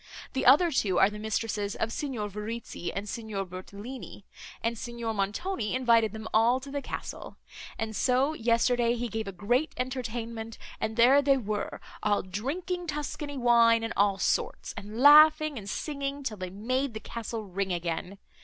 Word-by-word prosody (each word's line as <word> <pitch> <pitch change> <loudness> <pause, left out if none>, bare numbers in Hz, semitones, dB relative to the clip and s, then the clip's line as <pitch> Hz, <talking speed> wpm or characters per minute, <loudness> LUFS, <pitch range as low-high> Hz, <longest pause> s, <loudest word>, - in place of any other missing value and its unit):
The 265 - 0
other 325 +7 +7
two 200 - +1
are 195 - +5
the 210 - -7
mistresses 215 -1 -2
of 225 - -2
Signor 255 -8 -3
Verezzi 210 -2 -5
and 200 +2 -5
Signor 210 -3 -4
Bertolini; 200 +5 -9 0.4
and 230 +1 0
Signor 235 -1 -4
Montoni 210 - -2
invited 230 -4 +3
them 220 0 -7
all 235 +4 +4
to 275 +1 -10
the 285 0 -2
castle; - - -7 0.4
and 220 -1 -3
so, 260 +7 +2
yesterday, 235 -1 +2
he 240 0 -2
gave 220 -1 -4
a - - -3
great 240 - 0
entertainment; 235 -3 -4 0.2
and 220 +1 -3
there 255 +4 +6
they 275 -1 +4
were, 215 -4 -3 0.2
all 210 -1 +1
drinking 335 - -4
Tuscany 295 -1 -4
wine 235 -2 +5
and 225 - -3
all 200 -1 +3
sorts, - - -1
and 210 +3 -7
laughing 305 0 +7
and 200 -1 -8
singing, 280 +2 -3
till 220 -5 -3
they 185 -1 -5
made 245 +6 -2
the - - -3
castle 225 0 -5
ring 195 0 -3
again. 175 +2 -3
230 Hz, 165 wpm, -28 LUFS, 210-265 Hz, 0.4 s, other